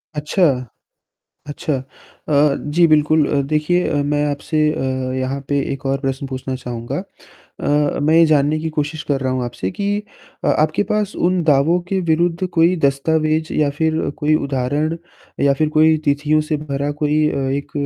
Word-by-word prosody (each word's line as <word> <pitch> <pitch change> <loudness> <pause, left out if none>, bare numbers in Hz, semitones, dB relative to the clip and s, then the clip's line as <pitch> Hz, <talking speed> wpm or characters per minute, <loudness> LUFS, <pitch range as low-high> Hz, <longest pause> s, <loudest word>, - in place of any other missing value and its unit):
अच्छा, 150 +5 0 1.0
अच्छा 145 +1 -3 0.5
अ, 145 -1 +3
जी, 170 +4 +2
बिल्कुल 155 -1 +3
अ, 145 - +1
देखिए 155 +3 +1
मैं 145 +1 0
आपसे 145 +2 -3
अ, 130 -2 -2
यहाँ 130 +1 -2
पे 145 - +1
1 135 0 -7
और 135 0 0
प्रश्न 135 0 -3
पूछना 130 0 -5
चाहूँगा 120 -2 -5 0.6
अ, 145 0 +1
मैं 155 +2 +2
ये 165 0 +7
जानने 150 0 +2
की 160 - -2
कोशिश 150 0 -3
कर 140 -2 +1
रहा 130 -1 -1
हूँ 130 -1 -1
आपसे 115 -6 -4
कि 200 - -3 0.6
अ, - - +2
आपके 155 +6 +2
पास 210 -1 0
उन 180 0 +1
दावों 155 +3 +3
के 190 0 0
विरुद्ध 170 +2 +1
कोई 170 +2 +3
दस्तावेज 155 +3 0
या 150 -2 +1
फिर 160 0 +1 0.2
कोई 155 0 +2
उदाहरण 145 +3 -1 0.5
या 140 - +5
फिर 155 +2 +1
कोई 155 0 +5
तिथियों 145 +2 +2
से 155 0 -2
भरा 145 -1 -3
कोई 150 +1 +2
अ, - - -3
एक 140 +1 -3
150 Hz, 170 wpm, -19 LUFS, 140-160 Hz, 1.0 s, ये